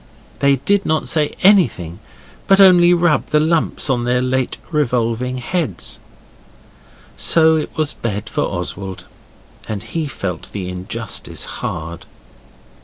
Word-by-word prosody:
They 140 0 +4
did 195 +10 +1
not 155 0 0
say 150 -2 +1
anything, 120 - +3 0.5
but 195 0 +5
only 180 -3 +7
rubbed 175 -3 +2
the 150 - +3
lumps 160 +1 +1
on 125 -3 +1
their 125 +1 +1
late 130 0 -1
revolving 125 -3 0
heads. 125 - -3 1.2
So 160 -1 +4
it 155 - -4
was 155 -1 0
bed 105 -3 -4
for - - -2
Oswald, 95 -2 -4 0.6
and 105 -1 -4
he 155 +7 -3
felt 90 - -5
the 95 -3 -4
injustice 95 +4 -4
hard. 85 +1 -6
130 Hz, 125 wpm, -18 LUFS, 105-160 Hz, 1.2 s, only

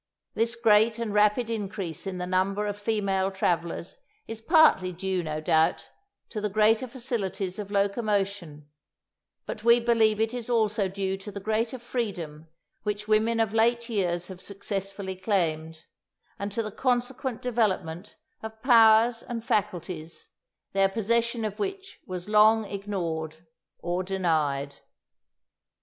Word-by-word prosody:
This 230 +1 0
great 220 0 +4
and 230 -3 -3
rapid 210 +3 +3
increase 195 -6 -4
in 190 -1 -4
the 180 - -3
number 190 +3 0
of 205 -1 -2
female 200 -2 0
travellers 175 - -2 0.3
is 225 0 -6
partly 305 - +5
due, 185 +1 -2
no 155 -2 -4
doubt, 160 +2 +1 0.4
to 215 - -4
the 210 - -1
greater 220 +4 +3
facilities 210 -7 -3
of 205 -1 -5
locomotion; 200 -6 -1 0.8
but 215 - -6
we 235 +1 +6
believe 225 -2 +3
it 225 +1 0
is 245 -1 -5
also 215 -4 +2
due 190 0 -2
to 195 +2 -9
the 200 - -6
greater 220 +4 -1
freedom 180 -11 -5 0.3
which 210 0 -3
women 220 +2 +2
of 220 -2 +1
late 235 +1 +2
years 175 -5 0
have 185 0 -10
successfully 195 -1 -4
claimed, 165 -5 -1 0.6
and 200 +1 -3
to 230 +3 -1
the 215 - -5
consequent 250 +1 -1
development 210 -7 -1 0.3
of 220 0 -9
powers 230 -1 +6
and 230 -2 -6
faculties, 180 -6 -3 0.4
their 195 0 +3
possession 230 +2 0
of 210 0 -5
which 390 -1 -5
was 180 0 -5
long 215 +1 +5
ignored 170 -6 -4 0.3
or 175 +1 -2
denied. 155 -7 -1
205 Hz, 135 wpm, -27 LUFS, 185-225 Hz, 0.8 s, we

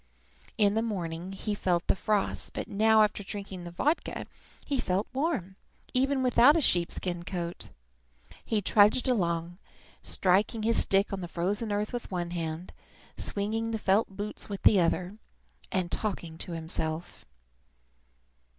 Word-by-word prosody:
In 205 -3 +4
the 220 - +1
morning 180 -5 -3
he 210 +2 -4
had 205 - -3
felt 175 -2 +1
the - - +2
frost; 210 0 -1
but - - -4
now, 220 +1 +5
after 210 -1 0
drinking 195 -2 -6
the - - -5
vodka, 290 - -1 0.4
he 280 -2 -1
felt 190 -1 0
warm, 255 - -1 0.4
even 265 +1 +2
without 255 +3 +6
a - - +4
sheep 175 - +2
skin 175 -2 -3
coat. 175 -1 -4 0.7
He 215 -3 -1
trudged 210 +7 +4
along, 175 -6 0 0.4
striking 200 +4 +1
his 230 +1 +4
stick 195 +1 +2
on 195 - -3
the 175 - -4
frozen 200 +6 -1
earth 210 +3 -1
with 245 - -4
one 175 -2 -3
hand, 165 0 -4 0.4
swinging 220 +3 -1
the 225 - -1
felt 210 +1 +2
boots 205 +2 -6
with 200 -1 -5
the 205 - +7
other, 180 +3 0 0.5
and 185 -2 -1
talking 170 -6 -3
to 175 - -5
himself. 160 0 -4
195 Hz, 150 wpm, -29 LUFS, 175-220 Hz, 0.7 s, the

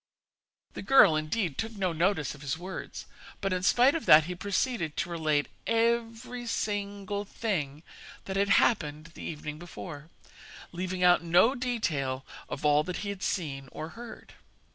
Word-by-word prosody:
The - - -6
girl, 200 -12 +6
indeed, 155 +1 -1
took 225 -1 -3
no 185 -3 0
notice 165 -3 +1
of 150 - -13
his 145 +1 -2
words, 185 +3 -7 0.3
but 195 -2 -1
in 180 - -1
spite 245 +8 +5
of 330 - -3
that 155 +1 +9
he 180 +4 -4
proceeded 185 - -2
to 175 - -2
relate 155 -3 +1 0.2
every 230 +1 0
single 205 -2 -2
thing 160 -9 -3 0.4
that 190 - -4
had 200 +1 +2
happened 155 -7 +2
the - - -11
evening 150 -1 -6
before, 165 -3 -9 0.6
leaving 180 +1 -3
out 180 0 +6
no 175 +9 +4
detail 160 - -2 0.2
of 145 - -5
all 150 0 +5
that 180 0 -4
he - - -3
had 200 -2 -5
seen 135 -9 -3
or 155 - -6
heard. 235 +3 -11
180 Hz, 160 wpm, -29 LUFS, 155-210 Hz, 0.6 s, that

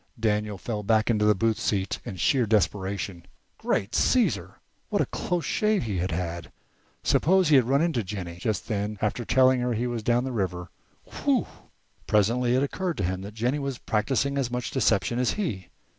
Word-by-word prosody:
Daniel 105 -2 0
fell 105 +2 -4
back 110 +2 +2
into 105 -2 +2
the 105 0 +5
booth 110 +3 +1
seat 95 -2 -1
in - - -6
sheer 120 - +2
desperation. 100 -3 -1 0.4
Great 100 +5 -1
Caesar! 250 - +1 0.3
what - - 0
a - - +3
close 175 -4 -2
shave 215 - +1
he 105 -5 -2
had 90 +2 -1
had! 85 0 -4 0.5
Suppose 185 0 +3
he 150 - +6
had 130 -3 +5
run 140 +3 +3
into 160 -10 0
Jennie 90 -3 -6
just 105 +3 -2
then, 105 -1 -2
after 110 +3 -1
telling 130 +2 +4
her 125 0 0
he 115 +2 -1
was 120 -2 -2
down 120 +3 +2
the 130 - -3
river! 90 -5 -3 0.3
Whew! - - 0 0.6
Presently 120 +4 +2
it 130 - +2
occurred 175 +2 -2
to 100 - -1
him 90 +1 -2
that 100 +2 -9
Jennie 125 +6 0
was 140 -3 -3
practising 135 +7 0
as 130 -3 -1
much 125 -1 -3
deception 110 -3 +1
as 125 - +1
he. 105 - -3
110 Hz, 190 wpm, -26 LUFS, 100-130 Hz, 0.6 s, he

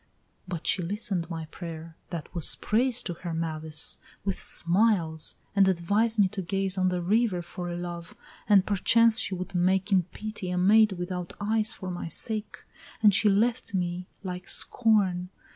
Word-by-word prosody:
But 175 -3 -6
she 190 - +2
listen'd 185 -1 -1
my 165 -2 -5
prayer, 165 -2 -8
that 170 -2 -7
was 170 -4 +6
praise 245 +3 +1
To 175 - -4
her 170 0 -6
malice, 160 -1 -2 0.3
with 195 -2 -2
smiles, 170 -4 +2 0.2
and 195 -1 +5
advised 200 +6 +1
me 205 -2 +5
to 190 - -5
gaze 195 +1 -1
On 185 -1 +1
the 180 -1 -2
river 205 -2 +1
for 175 0 -6
love, 175 -1 -7 0.3
and 195 -2 +5
perchance 225 +3 +3
she 190 - -1
would 185 +2 -6
make 190 +3 +1
In 190 -2 +5
pity 200 +2 -7
a 180 - -2
maid 210 +3 +4
without 180 -1 -5
eyes 215 +2 0
for 185 -4 -7
my 175 -1 -5
sake, 215 +5 -3 0.4
And 210 -2 +6
she 210 +2 +4
left 225 +1 0
me 180 0 -3 0.2
like 180 -1 -6
Scorn. 195 -6 +2
185 Hz, 165 wpm, -27 LUFS, 175-210 Hz, 0.4 s, was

